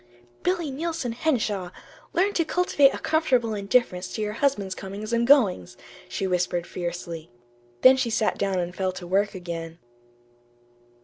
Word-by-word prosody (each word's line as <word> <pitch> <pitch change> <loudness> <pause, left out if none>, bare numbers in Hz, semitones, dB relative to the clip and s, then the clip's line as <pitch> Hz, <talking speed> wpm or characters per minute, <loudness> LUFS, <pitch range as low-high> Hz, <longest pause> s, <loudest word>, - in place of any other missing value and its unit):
"Tut, 120 - -31
tut, 120 0 -27 0.2
Billy 345 -5 0
Neilson 320 -3 -3
Henshaw! 220 - -1 0.4
Learn 385 +4 +1
to 335 - +2
cultivate 315 -4 +3
a - - -5
comfortable 260 -8 +1
indifference 200 -3 +1
to 220 - -3
your 210 0 -2
husband's 215 -7 0
comings 200 +4 -6
and 235 0 +2
goings," 215 - +3 0.3
she 195 - -2
whispered 180 -1 0
fiercely. 170 -2 -5 0.5
Then 260 +1 +8
she 260 -3 0
sat 220 -1 0
down 195 -2 0
and 180 0 -3
fell 185 -1 -1
to 180 - -8
work 195 +3 +1
again. 165 -2 -6
205 Hz, 160 wpm, -25 LUFS, 180-265 Hz, 0.5 s, Then